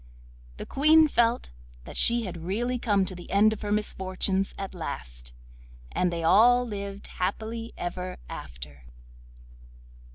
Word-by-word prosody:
The - - -6
Queen 310 +3 +5
felt 235 - +1 0.3
that - - -10
she 235 0 +4
had 175 -5 -6
really 240 +8 -1
come 205 -5 +2
to 185 - -4
the 175 -1 -10
end 210 +2 +4
of 215 - -8
her 205 - -3
misfortunes 190 -2 -1
at 195 -1 -5
last, - - -7 0.6
and 180 -1 +1
they 170 -1 -3
all 240 +8 +5
lived 200 -2 -6
happily 225 +5 -3
ever 180 +1 -4
after. 65 +1 -9
195 Hz, 135 wpm, -27 LUFS, 175-230 Hz, 0.6 s, Queen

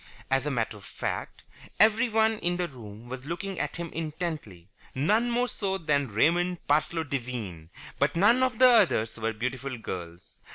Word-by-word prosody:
As 135 +2 +2
a - - +1
matter 115 -5 -1
of 100 - -15
fact, - - -5 0.4
everyone 220 0 +4
in 175 0 -1
the 180 -1 -1
room 115 -5 -11
was 130 +1 -7
looking 190 +3 -4
at - - -2
him 170 -1 -5
intently, 155 - -5 0.3
none 210 - +2
more 245 +1 +1
so 195 -5 -2
than 145 -5 +1
Raymond 170 - +2
Parsloe 155 +3 +2
Devine, 120 - -5 0.3
but - - +2
none 210 +8 +5
of 255 -3 +1
the 255 - +8
others 185 - +3
were 115 0 0
beautiful 125 +3 -4
girls. 85 -5 -8
150 Hz, 165 wpm, -28 LUFS, 115-195 Hz, 0.4 s, the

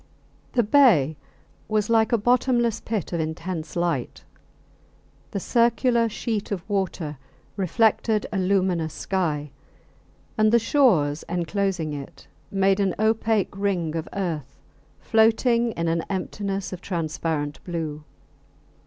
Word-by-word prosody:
The 240 - +3
bay 205 - +5 0.5
was 215 -1 0
like 225 0 +3
a 235 - +4
bottomless 240 0 +2
pit 215 -5 -3
of 170 - -1
intense 160 +1 -4
light. 170 -8 -2 1.1
The 200 - -3
circular 235 +1 +2
sheet 215 -2 -3
of 190 -3 -4
water 185 -8 -2 0.4
reflected 215 +2 +2
a 195 - 0
luminous 185 -4 +1
sky, 155 -7 -2 0.9
and 215 0 +5
the 235 - +6
shores 210 - +3
enclosing 175 -1 -1
it 140 -2 -9 0.2
made 195 0 +2
an 195 -3 +1
opaque 220 -2 +1
ring 185 -5 -1
of 165 -1 -4
earth 160 -8 -4 0.4
floating 230 +1 +3
in 170 0 -2
an 165 0 +1
emptiness 195 0 -3
of 180 - -7
transparent 160 -4 -3
blue. 160 -4 -4
195 Hz, 120 wpm, -24 LUFS, 165-220 Hz, 1.1 s, the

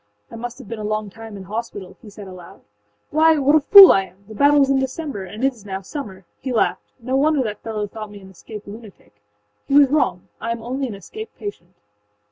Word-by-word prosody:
âI 230 - -8
must 240 0 -6
have 260 -6 -12
been 230 +1 -6
a - - -5
long 215 -1 -3
time 225 -1 -10
in 195 - -9
hospital,â 205 -2 -6
he 225 - -12
said 205 -1 -11
aloud. 185 -2 -12 0.5
âWhy 320 +1 +5
what 280 +1 +3
a - - +6
fool 390 +6 +10
I 195 0 +2
am! 190 +2 -22
The 220 - -10
battle 285 +6 +4
was 275 -1 +3
in 270 - +3
December, 265 -5 -4
and 210 +6 -8
it 270 - +2
is 225 -5 -17
now 195 -1 -5
summer!â 195 -6 -7 0.2
He 260 - -5
laughed. 235 - -1
âNo 260 +1 +1
wonder 295 -1 +2
that 215 -3 -5
fellow 215 -2 -3
thought 215 +1 -8
me 205 0 -11
an 190 -1 -14
escaped 210 +3 -11
lunatic. 200 - -13 0.5
He 275 - +1
was 280 -2 +6
wrong: 290 - 0
I 230 - -3
am 230 -1 -8
only 260 +3 -3
an 220 - -7
escaped 435 - -10
patient. 185 - -8
225 Hz, 235 wpm, -21 LUFS, 200-275 Hz, 0.5 s, fool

